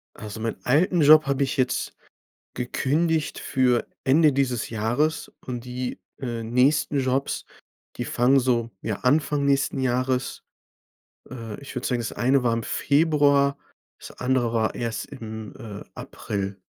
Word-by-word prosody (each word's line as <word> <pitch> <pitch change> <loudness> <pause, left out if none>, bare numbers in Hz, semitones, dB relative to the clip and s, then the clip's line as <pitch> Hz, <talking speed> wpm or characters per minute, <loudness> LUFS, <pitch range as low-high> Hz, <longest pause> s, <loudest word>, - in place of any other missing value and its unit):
Also 105 0 -8
meinen 115 0 -3
alten 165 +6 +3
Job 155 +1 +7
habe 140 0 +1
ich 135 - -2
jetzt 130 -1 0 0.6
gekündigt 150 +5 0
für 125 -2 +1 0.2
Ende 150 +2 +5
dieses 130 -5 -1
Jahres. 120 +9 -1
Und 125 -1 -5
die, 125 0 -4 0.2
äh, 120 -3 -3
nächsten 135 +5 +2
Jobs, 130 +1 -1 0.5
die - - -3
fangen 130 +3 +3
so, 120 -2 0
ja, 110 - -2
Anfang 145 +2 +2
nächsten 140 -1 +1
Jahres. 130 0 -1 0.9
Äh, 115 -2 -7
ich 140 - -10
würde 125 - -3
sagen, 125 -2 0
das 115 - -4
eine 130 +2 +2
war 120 -2 +2
im 115 0 -1
Februar, 140 0 +2 0.4
das - - -11
andere 125 -2 0
war 110 -1 0
erst 115 -3 -3
im, 110 -5 -8
äh, 105 -2 -8
April. 100 -1 -5
130 Hz, 145 wpm, -24 LUFS, 115-140 Hz, 0.9 s, Job